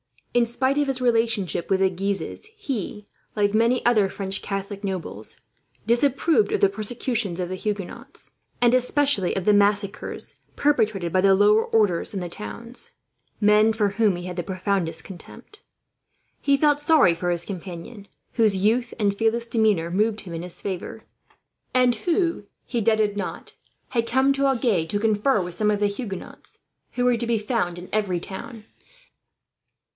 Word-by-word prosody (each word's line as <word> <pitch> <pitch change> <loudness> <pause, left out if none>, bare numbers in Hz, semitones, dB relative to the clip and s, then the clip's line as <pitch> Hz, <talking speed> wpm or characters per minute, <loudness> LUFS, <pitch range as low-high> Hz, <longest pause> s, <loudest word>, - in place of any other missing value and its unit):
In 240 -1 +4
spite 260 +4 0
of 290 - +1
his 265 -1 -1
relationship 225 -7 0
with 190 - +2
the 190 - +4
Guises 195 - -3
he, 230 - -4 0.3
like 205 -1 +1
many 230 +3 +2
other 215 -5 +4
French 190 0 -4
Catholic 200 +1 -5
nobles, 180 - -5 0.5
disapproved 245 +1 +2
of - - 0
the 200 - +5
persecutions 215 -2 -3
of 180 -1 -2
the 185 - -3
Huguenots, 205 -2 -5 0.3
and 240 0 +5
especially 255 -5 +1
of 190 - -2
the 210 - +5
massacres 205 -1 0 0.2
perpetrated 215 - +1
by 185 - +3
the 195 0 +5
lower 210 +3 +4
orders 205 -6 +1
in - - -1
the 175 -1 -5
towns, 230 +5 -8 0.5
men 210 +1 +5
for 210 -2 +1
whom 205 -1 +2
he 175 - -6
had 180 0 -6
the - - 0
profoundest 185 -2 -2
contempt. 220 - -12 0.8
He 280 -1 +3
felt 290 0 +3
sorry 295 - +5
for 175 +1 -3
his 175 -1 +1
companion, 195 +2 -8 0.3
whose 220 -4 +4
youth 230 +5 +1
and 205 -3 +1
fearless 225 +2 +1
demeanour 215 -8 +1
moved 215 +3 +1
him 180 -5 -9
in 165 - -4
his 180 -1 -4
favour; 190 -3 -5 0.7
and 250 -1 +4
who, 335 - 0 0.2
he 240 - -2
doubted 215 -1 +2
not, 200 - -5 0.4
had 230 -2 0
come 265 +3 +3
to 275 0 +1
Agen 230 -11 +1
to 205 - -1
confer 215 +2 +2
with 175 -1 -2
some 210 +4 +1
of 205 -1 0
the 205 - +4
Huguenots, 200 -2 -7 0.3
who 245 - -1
were 245 -1 +3
to 235 +1 -3
be 235 -1 +2
found 210 -5 -1
in 175 +1 -9
every 195 -5 0
town. 210 +5 -8
210 Hz, 165 wpm, -24 LUFS, 190-235 Hz, 0.8 s, the